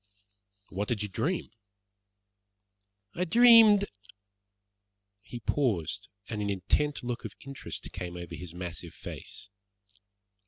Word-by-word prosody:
"What 100 Hz, +2 st, -3 dB
did 110 Hz, -4 st, 0 dB
you 105 Hz, -, -4 dB
dream?" 170 Hz, -, -1 dB, 1.6 s
"I 180 Hz, -, -1 dB
dreamed 220 Hz, +1 st, +8 dB, 0.7 s
" 100 Hz, 0 st, -54 dB, 0.5 s
He 120 Hz, +2 st, -8 dB
paused, 110 Hz, -, 0 dB, 0.2 s
and 105 Hz, -2 st, -3 dB
an 100 Hz, -, -1 dB
intent 125 Hz, +10 st, 0 dB
look 120 Hz, 0 st, -3 dB
of -, -, -6 dB
interest 140 Hz, -1 st, -6 dB
came 90 Hz, -1 st, -6 dB
over 85 Hz, -1 st, -7 dB
his 90 Hz, -1 st, -8 dB
massive 90 Hz, -1 st, -6 dB
face. 100 Hz, -, -8 dB
110 Hz, 115 wpm, -30 LUFS, 95-150 Hz, 1.6 s, dreamed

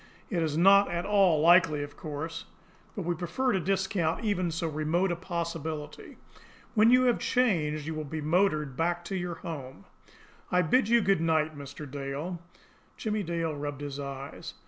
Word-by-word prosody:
It 175 Hz, -4 st, 0 dB
is 155 Hz, -2 st, -1 dB
not 200 Hz, +3 st, +6 dB
at 175 Hz, 0 st, -2 dB
all 195 Hz, -7 st, +4 dB
likely, 165 Hz, -3 st, +5 dB
of 145 Hz, 0 st, -9 dB
course; 160 Hz, +3 st, -6 dB, 0.5 s
but 200 Hz, -, -3 dB
we 175 Hz, +1 st, 0 dB
prefer 175 Hz, +10 st, -1 dB
to 190 Hz, -, +1 dB
discount 190 Hz, 0 st, 0 dB
even 185 Hz, -4 st, 0 dB
so 165 Hz, +1 st, -2 dB
remote 160 Hz, +4 st, 0 dB
a -, -, 0 dB
possibility. 165 Hz, -4 st, -5 dB, 0.6 s
When 220 Hz, 0 st, +5 dB
you 250 Hz, +1 st, +6 dB
have 245 Hz, -2 st, +3 dB
changed, 160 Hz, -, +1 dB
you 160 Hz, -, -3 dB
will 155 Hz, 0 st, -4 dB
be 155 Hz, +2 st, -5 dB
motored 155 Hz, -3 st, +1 dB
back 175 Hz, +3 st, -1 dB
to 190 Hz, -, -4 dB
your 175 Hz, -2 st, -3 dB
home. 135 Hz, -, -8 dB, 0.7 s
I 180 Hz, 0 st, +3 dB
bid 220 Hz, +7 st, +2 dB
you 235 Hz, 0 st, +5 dB
good 195 Hz, -4 st, +2 dB
night, 160 Hz, -1 st, +1 dB
Mr. 145 Hz, +1 st, -8 dB
Dale." 145 Hz, +5 st, -5 dB, 0.6 s
Jimmie 215 Hz, -2 st, -1 dB
Dale 165 Hz, -3 st, -2 dB
rubbed 145 Hz, -1 st, -5 dB
his 145 Hz, -1 st, -5 dB
eyes. 140 Hz, 0 st, -7 dB
165 Hz, 170 wpm, -29 LUFS, 150-190 Hz, 0.7 s, not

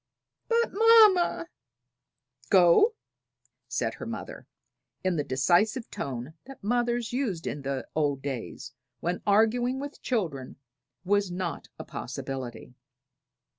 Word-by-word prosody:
"But, 470 Hz, 0 st, +2 dB
mamma 425 Hz, -6 st, +5 dB, 0.5 s
" 130 Hz, -1 st, -34 dB
"Go!" 190 Hz, -, +5 dB, 0.7 s
said -, -, -1 dB
her -, -, -8 dB
mother, -, -, -7 dB, 0.6 s
in 185 Hz, -1 st, +1 dB
the 150 Hz, -, 0 dB
decisive 180 Hz, -, +1 dB
tone 130 Hz, +2 st, -5 dB
that 270 Hz, -4 st, -12 dB
mothers 240 Hz, +1 st, 0 dB
used 220 Hz, -11 st, -2 dB
in 145 Hz, -, -4 dB
the 135 Hz, -1 st, -3 dB
old 145 Hz, -3 st, 0 dB
days, 130 Hz, -2 st, -6 dB, 0.3 s
when 175 Hz, +5 st, -2 dB
arguing 240 Hz, +5 st, +3 dB
with 285 Hz, +1 st, -7 dB
children 165 Hz, -, -2 dB, 0.5 s
was 200 Hz, 0 st, +2 dB
not 175 Hz, -2 st, -4 dB
a -, -, -7 dB
possibility. 130 Hz, -2 st, -6 dB
185 Hz, 115 wpm, -27 LUFS, -, 0.7 s, mamma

